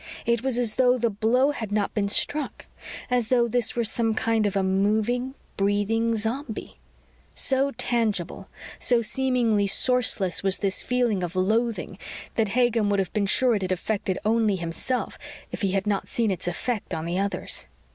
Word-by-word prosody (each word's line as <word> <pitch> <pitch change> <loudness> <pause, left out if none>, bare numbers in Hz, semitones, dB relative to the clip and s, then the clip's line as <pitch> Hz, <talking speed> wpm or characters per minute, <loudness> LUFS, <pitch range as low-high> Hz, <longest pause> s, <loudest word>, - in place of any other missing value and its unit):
It 235 -1 +1
was 260 -1 0
as 235 -3 +1
though 250 -1 +4
the 235 -2 0
blow 235 +7 +2
had 225 -8 -5
not 205 -1 0
been 200 -2 0
struck; 290 +7 -1 0.5
as 245 -3 +1
though 240 -1 +3
this 240 0 0
were 235 - +1
some 225 0 +1
kind 225 -2 +1
of 200 - -3
a 195 - +2
moving, 215 +7 0 0.2
breathing 205 +3 +1
zombie. 225 +2 -3 0.6
So 270 +1 +3
tangible, 210 -6 -1 0.3
so 240 -2 +3
seemingly 230 -3 +1
sourceless 220 -4 +1
was 195 -1 +1
this 195 -1 0
feeling 245 -6 0
of 175 0 -4
loathing, 210 0 0 0.3
that 220 -3 +1
Hagen 235 -4 +2
would 200 - +2
have 190 -2 -1
been 205 -2 0
sure 250 +4 +4
it 205 - 0
had 185 -1 -2
affected 190 0 -1
only 220 -2 +2
himself 175 +8 -3 0.3
if - - -6
he 195 -2 0
had 195 0 0
not 205 -2 -1
seen 225 -3 0
its 185 -1 -4
effect 205 +1 -3
on 160 0 -4
the 175 +2 -1
others. 195 -2 -2
220 Hz, 175 wpm, -25 LUFS, 195-240 Hz, 0.6 s, though